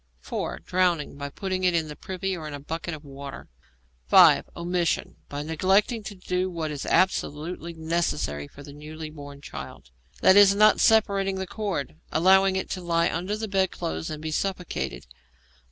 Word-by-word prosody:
(4) -, -, -4 dB
Drowning 180 Hz, -6 st, +1 dB
by 140 Hz, 0 st, -5 dB
putting 185 Hz, +4 st, -3 dB
it 180 Hz, -1 st, +3 dB
in 160 Hz, -2 st, +1 dB
the 150 Hz, -, -7 dB
privy 190 Hz, +2 st, -4 dB
or 160 Hz, -3 st, -6 dB
in 145 Hz, -, -6 dB
a -, -, -7 dB
bucket 160 Hz, +3 st, -5 dB
of 150 Hz, 0 st, -13 dB
water. 140 Hz, 0 st, -9 dB, 0.6 s
(5) -, -, +7 dB
Omission: 175 Hz, 0 st, -1 dB
by 145 Hz, 0 st, -4 dB
neglecting 190 Hz, +8 st, +2 dB
to 205 Hz, 0 st, -8 dB
do 185 Hz, 0 st, -2 dB
what 165 Hz, -3 st, -3 dB
is 145 Hz, -2 st, -5 dB
absolutely 170 Hz, -1 st, 0 dB
necessary 160 Hz, -, -2 dB
for 140 Hz, -, -13 dB
the 145 Hz, -, -11 dB
newly 155 Hz, +1 st, -8 dB
born 145 Hz, -2 st, -10 dB
child 65 Hz, -, -9 dB, 0.4 s
e.g., 200 Hz, +1 st, +8 dB
not 215 Hz, +1 st, +5 dB
separating 200 Hz, -3 st, +3 dB
the 190 Hz, 0 st, -3 dB
cord; 180 Hz, -, -4 dB
allowing 190 Hz, +3 st, +4 dB
it 190 Hz, -, -2 dB
to 185 Hz, -, -3 dB
lie 170 Hz, -1 st, +1 dB
under 185 Hz, +6 st, -2 dB
the 220 Hz, 0 st, -4 dB
bed 190 Hz, -2 st, +1 dB
clothes 80 Hz, 0 st, -4 dB
and 155 Hz, 0 st, -6 dB
be 160 Hz, -, -3 dB
suffocated. 180 Hz, -, -3 dB
170 Hz, 170 wpm, -26 LUFS, 150-190 Hz, 0.6 s, e.g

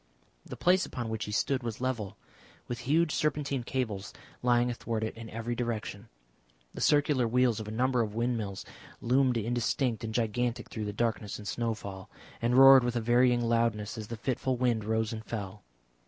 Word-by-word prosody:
The -, -, -9 dB
place 185 Hz, +1 st, +3 dB
upon 120 Hz, -3 st, -4 dB
which 110 Hz, 0 st, -3 dB
he 105 Hz, -, -6 dB
stood 130 Hz, +5 st, 0 dB
was 115 Hz, -3 st, -5 dB
level, 125 Hz, -6 st, -3 dB, 0.5 s
with 120 Hz, -2 st, -4 dB
huge 160 Hz, +1 st, +3 dB
serpentine 145 Hz, -3 st, 0 dB
cables 110 Hz, -6 st, -3 dB, 0.3 s
lying 120 Hz, 0 st, +3 dB
athwart 115 Hz, -2 st, -3 dB
it 110 Hz, -, -3 dB
in 115 Hz, 0 st, -9 dB
every 115 Hz, +2 st, -4 dB
direction. 115 Hz, -2 st, -4 dB, 0.6 s
The -, -, -7 dB
circular 145 Hz, -4 st, +3 dB
wheels 120 Hz, -1 st, +2 dB
of 110 Hz, -, -6 dB
a -, -, -5 dB
number 125 Hz, +2 st, +1 dB
of 105 Hz, -2 st, -3 dB
windmills 115 Hz, -5 st, -2 dB, 0.3 s
loomed 130 Hz, 0 st, +2 dB
indistinct 120 Hz, +1 st, -1 dB
and 110 Hz, -, -3 dB
gigantic 120 Hz, +1 st, -1 dB
through 110 Hz, -2 st, -4 dB
the 105 Hz, -, -3 dB
darkness 110 Hz, -1 st, -2 dB
and 105 Hz, -, -9 dB
snowfall, 105 Hz, -4 st, -4 dB, 0.3 s
and 120 Hz, +2 st, +2 dB
roared 135 Hz, -1 st, +9 dB
with 120 Hz, 0 st, -1 dB
a -, -, +2 dB
varying 120 Hz, +1 st, +3 dB
loudness 115 Hz, -2 st, 0 dB
as 110 Hz, -2 st, -6 dB
the 115 Hz, -, -6 dB
fitful 130 Hz, +2 st, -1 dB
wind 120 Hz, -4 st, +1 dB
rose 110 Hz, +1 st, 0 dB
and 110 Hz, 0 st, -6 dB
fell. 105 Hz, -3 st, -6 dB
115 Hz, 180 wpm, -30 LUFS, 110-125 Hz, 0.6 s, roared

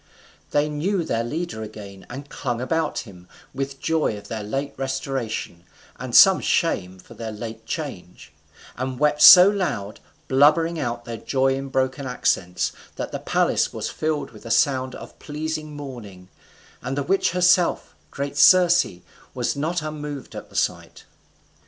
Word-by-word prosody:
They 145 Hz, +1 st, +1 dB
knew 170 Hz, +5 st, -1 dB
their 115 Hz, -7 st, -1 dB
leader 150 Hz, -1 st, -4 dB
again, 105 Hz, -3 st, -10 dB
and 140 Hz, +3 st, -8 dB
clung 125 Hz, -5 st, -4 dB
about 160 Hz, +5 st, -1 dB
him, 90 Hz, -6 st, -14 dB, 0.3 s
with 135 Hz, 0 st, -4 dB
joy 155 Hz, -7 st, 0 dB
of 100 Hz, 0 st, -12 dB
their 110 Hz, -1 st, -4 dB
late 135 Hz, +7 st, -4 dB
restoration, 135 Hz, -9 st, -4 dB, 0.4 s
and -, -, -4 dB
some -, -, +8 dB
shame 90 Hz, +1 st, 0 dB
for 95 Hz, -, -15 dB
their 115 Hz, -1 st, -6 dB
late 110 Hz, +1 st, -8 dB
change; -, -, -7 dB, 0.4 s
and 130 Hz, +1 st, -4 dB
wept 150 Hz, +1 st, +1 dB
so 180 Hz, 0 st, +11 dB
loud, 175 Hz, -, -2 dB, 0.3 s
blubbering 155 Hz, +5 st, +3 dB
out 120 Hz, -2 st, -3 dB
their 115 Hz, -1 st, -6 dB
joy 135 Hz, +2 st, +1 dB
in 135 Hz, +1 st, -4 dB
broken 130 Hz, +1 st, -1 dB
accents, 90 Hz, -7 st, 0 dB, 0.2 s
that -, -, -5 dB
the -, -, -4 dB
palace -, -, +1 dB
was -, -, -4 dB
filled 155 Hz, -1 st, -2 dB
with 110 Hz, -, -14 dB
a 115 Hz, -, -8 dB
sound 130 Hz, +2 st, +1 dB
of -, -, -12 dB
pleasing 155 Hz, 0 st, -5 dB
mourning, 110 Hz, -10 st, -9 dB, 0.5 s
and 135 Hz, +2 st, -4 dB
the 145 Hz, -, 0 dB
witch 190 Hz, +7 st, +1 dB
herself, 180 Hz, -1 st, +2 dB, 0.2 s
great 140 Hz, 0 st, -5 dB
Circe, 180 Hz, +4 st, +6 dB, 0.5 s
was -, -, -1 dB
not 160 Hz, +3 st, -2 dB
unmoved 150 Hz, -2 st, -6 dB
at -, -, -9 dB
the -, -, -18 dB
sight. -, -, -2 dB
135 Hz, 155 wpm, -23 LUFS, 115-155 Hz, 0.5 s, so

